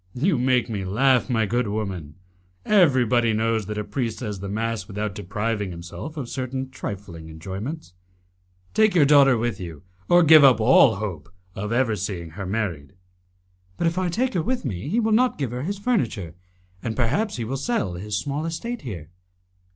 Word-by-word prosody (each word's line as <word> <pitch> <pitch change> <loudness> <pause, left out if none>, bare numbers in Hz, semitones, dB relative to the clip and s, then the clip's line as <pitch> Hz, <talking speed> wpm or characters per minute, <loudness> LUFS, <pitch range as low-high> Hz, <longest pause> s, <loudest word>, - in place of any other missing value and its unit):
"You 150 +2 +1
make 125 -1 +2
me 105 -5 -3
laugh, 125 +7 +2
my 115 -3 +2
good 120 +2 0
woman. 95 -8 -4 0.5
Everybody 125 - +4
knows 110 -1 0
that 105 0 -4
a 105 - -1
priest 115 0 -3
says 105 -5 -5
the 100 +1 -6
mass 110 -1 -2
without 105 0 -3
depriving 105 +1 -3
himself 90 - -8
of 135 -5 -4
certain 130 +1 -4
trifling 95 -9 -7
enjoyments. 95 - -6 0.8
Take 215 -3 +3
your 155 -5 +6
daughter 140 -3 +6
with 115 -3 -2
you, 85 -4 -8 0.3
or 175 0 +6
give 155 -1 +8
up 130 -5 +7
all 115 0 +6
hope 90 -8 -5 0.2
of 105 +3 -5
ever 120 -2 +2
seeing 90 -4 -5
her 95 +3 -6
married." 90 -9 -3 0.8
"But - - -1
if 170 +2 +1
I 185 -1 0
take 245 +8 0
her 175 - +1
with 245 0 -2
me, 100 0 -4
he 220 +7 +1
will 220 -1 +1
not 250 +3 +3
give 135 -5 -2
her 125 +1 -4
his 195 +8 -3
furniture, 155 - -1 0.5
and 115 -2 -3
perhaps 140 - 0
he 120 - -3
will 120 +5 -3
sell 135 - -1
his 100 +4 -3
small 145 +5 -3
estate 230 +9 -4
here." 90 - -7
115 Hz, 180 wpm, -24 LUFS, 100-145 Hz, 0.8 s, give